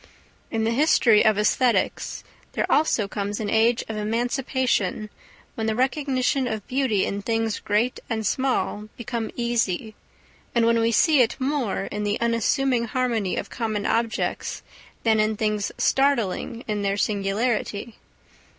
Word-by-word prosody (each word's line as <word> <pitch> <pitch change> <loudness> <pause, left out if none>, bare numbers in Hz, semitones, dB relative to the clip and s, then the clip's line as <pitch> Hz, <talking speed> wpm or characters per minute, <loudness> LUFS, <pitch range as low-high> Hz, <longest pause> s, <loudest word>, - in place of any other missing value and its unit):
In 225 -1 -1
the 225 - +1
history 235 -5 +4
of 215 -2 +4
æsthetics 230 +4 +1 0.3
there - - 0
also 245 -9 +2
comes 205 0 -3
an 210 -2 -2
age 225 +2 +3
of 220 - -4
emancipation 230 -1 -1 0.4
when 220 -1 -3
the 220 - 0
recognition 265 0 0
of 220 -3 -4
beauty 255 -7 +1
in 200 0 -3
things 225 0 -1
great 215 +4 0
and 220 -2 -2
small 215 -3 -1
become 235 -1 -4
easy, 230 -3 -1 0.6
and 235 -1 +4
when 230 0 +3
we 230 0 +2
see 290 +5 +4
it 235 - +2
more 260 -7 -1
in 210 - -5
the 205 0 -1
unassuming 235 +2 +1
harmony 230 -5 -1
of - - -5
common 215 -3 -2
objects 230 -1 -1 0.4
than 220 -1 +3
in 215 0 +1
things 210 -2 -1
startling 240 -4 +1
in 210 -2 -1
their 200 0 0
singularity. 210 +2 -1
225 Hz, 140 wpm, -24 LUFS, 210-245 Hz, 0.6 s, history